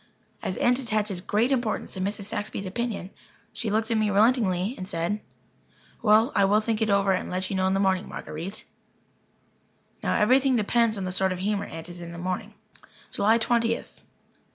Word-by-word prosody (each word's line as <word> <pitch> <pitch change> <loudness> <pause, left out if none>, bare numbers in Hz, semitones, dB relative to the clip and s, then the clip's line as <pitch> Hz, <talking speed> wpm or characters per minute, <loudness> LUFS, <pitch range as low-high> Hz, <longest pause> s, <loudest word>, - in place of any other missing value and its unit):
As 185 - -3
Aunt 245 +1 +3
attaches 210 -6 -1
great 215 +7 +1
importance 240 -5 -1
to 190 - -5
Mrs. 200 +2 -2
Saxby's 205 0 -4
opinion, 205 -1 -3 0.4
she 225 - -3
looked 220 +2 0
at 225 - +2
me 215 - +2
relentingly 205 -2 +3
and 185 - -7
said: 175 +5 -2 0.8
"Well, 220 +4 +5
I 200 - +3
will 205 +2 +4
think 220 0 -1
it 220 - +2
over 200 -1 +3
and 185 - -1
let 185 +1 -2
you - - -1
know 190 0 +2
in 190 - +1
the - - +1
morning, 190 -1 +1
Marguer_ite_." 175 +7 -6 1.4
Now, - - 0
everything 255 +4 +4
depends 230 0 +2
on 195 - -3
the 185 - -3
sort 190 +1 +1
of 185 - -2
humour 200 +2 -1
Aunt 165 -2 -8
is 175 0 -9
in 170 - -7
in 170 - -8
the - - -8
morning. 185 +4 -4 0.6
July 220 +3 +3
Twentieth. 230 0 -1
205 Hz, 190 wpm, -26 LUFS, 185-225 Hz, 1.4 s, Well